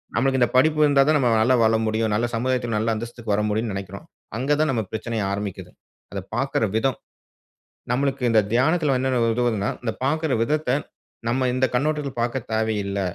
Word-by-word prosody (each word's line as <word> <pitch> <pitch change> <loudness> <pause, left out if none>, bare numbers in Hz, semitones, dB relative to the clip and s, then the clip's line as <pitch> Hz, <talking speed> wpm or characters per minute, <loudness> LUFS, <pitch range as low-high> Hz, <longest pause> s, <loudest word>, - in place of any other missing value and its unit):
நம்மளுக்கு 130 +2 +2
இந்த 120 - +4
படிப்பு 155 +4 +4
இருந்தா 145 -2 +4
தான் 155 - +4
நம்ம 130 -4 +2
நல்லா 125 +3 +4
வாழ 110 0 +4
முடியும். 110 0 0
நல்ல 110 +3 +1
சமுதாயத்துல 120 -1 -1
நல்ல 110 +1 +1
அந்தஸ்துக்கு 115 0 -5
வர 105 - +1
முடியுன்னு 110 0 -1
நெனைக்கிறோம். 95 0 -7 0.3
அங்க 135 +4 +1
தான் 155 0 +2
நம்ம 115 -4 0
பிரச்சனையே 110 0 -3
ஆரம்பிக்குது. 100 -1 -5 0.4
அத 100 - -3 0.2
பார்க்குற 135 -2 0
விதம். 130 +3 +1 1.0
நம்மளுக்கு 135 +1 0
இந்த 110 -1 +5
தியானத்துல 145 +3 +2
என்னென்ன 130 -1 +1
உதவுதுன்னா, 115 -4 0
இந்த 115 -2 -1
பார்க்குற 155 +1 0
விதத்த 150 +2 0 0.6
நம்ம 130 +2 +1
இந்த 130 +1 +2
கண்ணோட்டத்துல 145 +1 0
பார்க்க 120 +1 -2
தேவையில்ல. 105 -3 -1
120 Hz, 170 wpm, -23 LUFS, 110-135 Hz, 1.0 s, இந்த